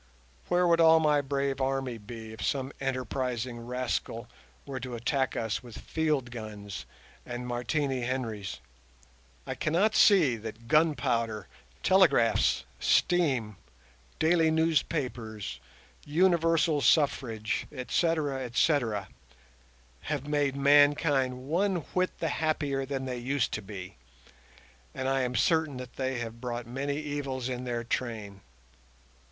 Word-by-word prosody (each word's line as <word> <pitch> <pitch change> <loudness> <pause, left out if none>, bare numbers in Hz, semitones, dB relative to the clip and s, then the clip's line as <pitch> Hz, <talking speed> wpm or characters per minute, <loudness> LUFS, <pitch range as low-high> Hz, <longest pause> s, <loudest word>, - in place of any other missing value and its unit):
Where 180 0 +3
would 170 -1 +4
all 160 0 +7
my 150 -2 +3
brave 140 -1 -1
army 135 -3 -1
be 110 0 -9
if 110 - -7
some 135 -1 -1
enterprising 130 -2 -2
rascal 125 -1 -3 0.4
were 135 -2 -5
to 125 -1 -5
attack 130 +3 0
us 110 -2 -2
with 120 -3 -11
field 150 -6 -1
guns 105 -4 -7 0.4
and 120 0 -6
Martini 125 +2 -1
Henrys? 115 -6 -3 0.8
I - - -3
cannot 180 +8 +1
see 165 - +5
that 110 +1 -9
gunpowder, 125 -7 +1 0.4
telegraphs, 165 -12 +4 0.2
steam, 130 - +2 0.6
daily 160 0 +3
newspapers, 135 -9 -1 0.4
universal 165 -1 +3
suffrage, 115 -6 +1
etc., 145 0 0
etc., 120 -5 +1 1.0
have 145 -2 -2
made 145 -2 +1
mankind 140 -2 +3
one 190 +5 +1 0.2
whit 185 0 0
the 165 - -1
happier 145 -3 -1
than 135 -1 -3
they 125 -2 -3
used 130 +1 0
to 110 - -3
be, 95 - -9 1.0
and 130 - -2
I 135 0 +2
am 125 0 -1
certain 155 - +2
that 125 -1 -9
they 130 -1 -1
have 115 -1 -6
brought 120 -1 -4
many 135 +4 -3
evils 145 -4 -3
in 125 -1 -4
their 120 -1 -2
train. 110 -5 -4
130 Hz, 120 wpm, -29 LUFS, 120-150 Hz, 1.0 s, all